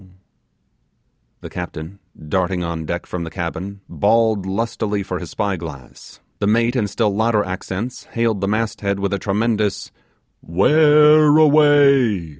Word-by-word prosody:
The - - -9
captain, 90 +1 -7 0.3
darting 90 +2 -1
on 85 -1 -4
deck 85 +2 -4
from 90 -1 -5
the 80 - -6
cabin, 95 +3 -6
bawled 110 -1 +1
lustily 105 0 -2
for 95 -2 -5
his 90 -3 -8
spy 100 -2 -2
glass; 75 -7 -11 0.2
the 100 - 0
mate 115 +3 +1
in 110 -5 0
still 105 0 -1
louder 110 -1 +1
accents 95 +6 -6
hailed 115 -4 -2
the 100 - -1
masthead 105 -2 -2
with 100 0 -2
a 100 - -1
tremendous 105 +1 -1 0.5
'where 150 - +4
away? 140 - +4
100 Hz, 135 wpm, -19 LUFS, 90-115 Hz, 0.5 s, where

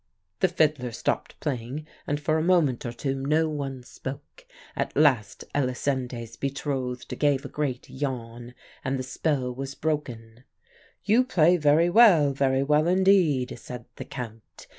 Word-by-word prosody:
"The 190 - +4
fiddler 150 -8 +1
stopped - - -3
playing, 135 +2 -4 0.2
and 145 0 -1
for 155 +1 +1
a - - 0
moment 160 -10 +2
or - - -3
two 135 +3 -2
no 150 +4 +1
one 135 -4 -4
spoke. 140 - -9 0.3
At - - -3
last 130 -10 +2
Elisinde's 125 -3 -2
betrothed 135 -3 -3
gave 145 -1 +2
a - - -5
great 135 -5 -3
yawn, 120 -3 -5 0.3
and 135 0 -1
the 130 - -3
spell 130 -1 -1
was 135 +2 -6
broken. 125 -7 -4 0.6
"'You 220 +5 +4
play 180 -9 +4
very 160 +2 +3
well 175 -10 +6
very 135 0 +1
well, 150 +3 +3
indeed,' 180 -8 +3
said 125 -1 -8
the - - -6
Count. 115 -4 -9
140 Hz, 145 wpm, -26 LUFS, 125-155 Hz, 0.6 s, well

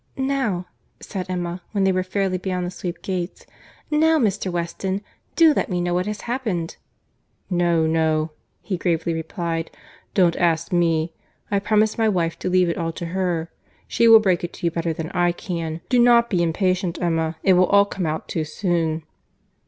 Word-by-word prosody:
"Now,"—said 200 -7 -4
Emma, 175 0 -3
when 200 -2 +1
they 190 - +4
were 185 0 +1
fairly 185 0 -1
beyond 180 -1 -2
the 175 - -4
sweep 180 -1 -6
gates,—"now 300 - -1
Mr. 205 -7 0
Weston, 185 +3 -3 0.3
do 325 -2 +6
let - - -1
me 180 -2 -1
know 175 0 0
what 180 +2 0
has 210 -1 -4
happened." 220 -10 -3 0.7
"No, 170 -2 +2
no,"—he 160 +3 -1
gravely 170 -1 0
replied.—"Don't 165 +2 -2
ask 165 -1 +1
me. 165 -1 +1 0.4
I 200 - +2
promised 215 +2 +1
my 220 -1 +3
wife 170 -4 -1
to - - -2
leave 180 0 +3
it 170 - -2
all 165 -1 -1
to 170 - -6
her. 175 -3 -1 0.4
She 235 - +3
will 225 -1 +10
break 185 -5 +1
it 175 - -4
to - - -6
you 170 - +2
better 165 0 -1
than 160 0 -5
I 175 -1 +2
can. 165 -3 -4
Do 250 - +3
not 235 -1 +5
be 180 -3 +2
impatient, 180 +1 0
Emma; 165 -2 0
it 190 - +5
will 180 0 +4
all 200 +1 +5
come 190 -4 -3
out 155 +1 -3
too 160 - -2
soon." 165 -1 -1
180 Hz, 175 wpm, -22 LUFS, 165-195 Hz, 0.7 s, will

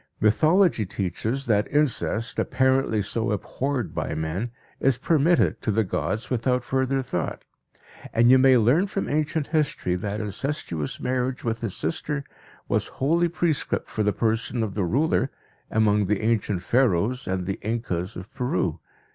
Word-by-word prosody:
Mythology 155 - +4
teaches 105 +7 -2
that 105 -3 +1
incest, 130 -6 0
apparently 130 -5 +2
so 110 +2 -1
abhorred 120 - -2
by 80 - -2
men, 80 +9 -2 0.3
is 135 -3 +2
permitted 165 +5 +2
to - - -2
the 110 +2 +2
gods 110 +3 -2
without 125 +1 +1
further 130 +1 0
thought, 90 -10 -3 0.7
and 120 +2 +5
you 130 - +7
may 130 -1 +6
learn 130 - +3
from 195 0 -3
ancient 155 +1 0
history 150 - 0
that 100 +3 -3
incestuous 105 - -3
marriage 130 +1 -1
with 115 -1 -2
his 110 -5 -3
sister 145 - -2 0.4
was - - 0
holy 165 +6 +2
prescript 170 -3 -1
for 110 - -2
the 105 0 +2
person 115 +2 0
of 105 -3 -3
the 100 -3 0
ruler 135 - +1 0.4
(among 105 -2 +2
the 105 +1 0
ancient 105 -4 0
Pharaohs 120 +1 +1
and 95 -1 -1
the 95 +1 -3
Incas 105 -4 -2
of 90 - -9
Peru). 90 - -1
115 Hz, 150 wpm, -25 LUFS, 105-135 Hz, 0.7 s, you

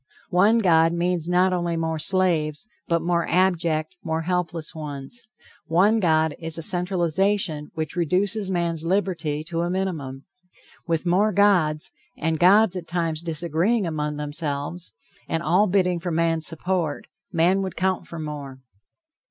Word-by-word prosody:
One 200 +6 +4
God 165 -6 +4
means 175 -1 0
not 180 +1 +3
only 175 -2 -1
more 160 -1 -2
slaves, 170 -3 0 0.2
but 170 -1 +1
more 170 0 0
abject, 170 -3 +1
more 160 -1 -2
helpless 170 -2 -2
ones. 150 - -8 0.4
One 200 +7 +3
God 160 -4 +2
is 165 -1 -2
a 165 - -1
centralization 180 -3 +1
which 155 0 -4
reduces 190 +4 0
man's 170 -3 -1
liberty 165 -5 -1
to 165 +1 -3
a 175 - -1
minimum. 160 -8 -3 0.6
With 165 0 -1
more 195 +5 +3
gods, 180 -7 +2 0.3
and 160 0 -1
gods 195 +2 +5
at 175 -2 -6
times 165 -3 -1
disagreeing 170 +6 0
among 150 -2 -2
themselves, 150 +2 -4 0.4
and 165 0 -1
all 180 +7 +3
bidding 180 -2 +1
for 175 +1 -4
man's 165 -1 +1
support, 165 -2 -2 0.3
man 180 +3 +2
would 190 -2 -4
count 185 0 -1
for 170 - -8
more. 145 -4 -6
170 Hz, 145 wpm, -24 LUFS, 160-185 Hz, 0.6 s, gods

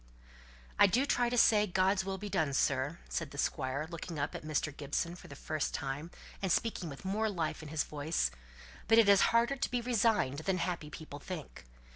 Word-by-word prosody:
"I 205 - +8
do 245 +8 +2
try 245 -4 +2
to 245 - -1
say, 210 -2 +5
God's 190 +1 +2
will 190 0 -3
be 205 +2 -6
done, 155 -7 0
sir," 140 +3 +1
said 165 -3 -3
the 140 - -11
Squire, 135 +1 -1
looking 170 0 -6
up 145 +1 -2
at - - -5
Mr. 155 -1 -2
Gibson 150 +4 -2
for 180 - -12
the 140 - -10
first 155 +1 -2
time, 145 +3 -4 0.3
and 190 -2 0
speaking 195 -6 0
with 140 +5 -10
more 215 +3 0
life 170 -6 -2
in 155 - -8
his 155 -1 0
voice; 145 - -1 0.6
"but 225 - +5
it's 200 -3 +7
harder 235 +4 +3
to - - -1
be 245 - 0
resigned 225 - +1
than 185 +3 0
happy 170 -4 -2
people 150 -1 -9
think." 155 - -8
170 Hz, 200 wpm, -32 LUFS, 145-205 Hz, 0.6 s, I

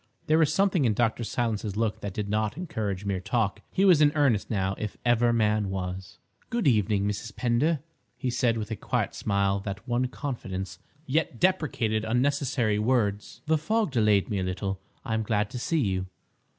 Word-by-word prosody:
There 155 +1 +3
was 155 -3 +4
something 195 -5 +2
in 110 -3 +2
Dr. 115 0 +1
Silence's 110 -3 -2
look 110 -1 -1
that 100 -2 -5
did 105 -1 -2
not 105 +3 -1
encourage 110 - -3
mere 100 -2 -1
talk. 105 +1 -1
He 195 - +2
was 175 -6 +6
in 145 -1 +6
earnest 135 -9 +2
now, 95 -3 0
if 105 -1 -4
ever 120 0 +4
man 105 -3 +2
was. 95 0 -5 0.3
"Good 235 -9 0
evening, 105 -4 +2
Mrs. 105 +1 -4
Pender," 130 +5 +1 0.4
he 130 -3 -2
said, 120 -2 +1
with 110 0 -4
a - - -1
quiet - - -1
smile 100 -1 0
that 100 +1 -6
won 125 +1 +1
confidence, 105 -9 -5 0.3
yet 140 -4 0
deprecated 125 - +1
unnecessary 125 -2 +1
words, 105 -3 0
"the 160 0 +2
fog 215 +3 0
delayed 105 -5 +3
me 105 -4 -1
a - - -1
little. 95 +1 -3 0.3
I 110 - -2
am 110 - +1
glad 105 -1 0
to 125 - -5
see 160 +5 0
you." 95 -5 -1
110 Hz, 185 wpm, -27 LUFS, 100-130 Hz, 0.4 s, was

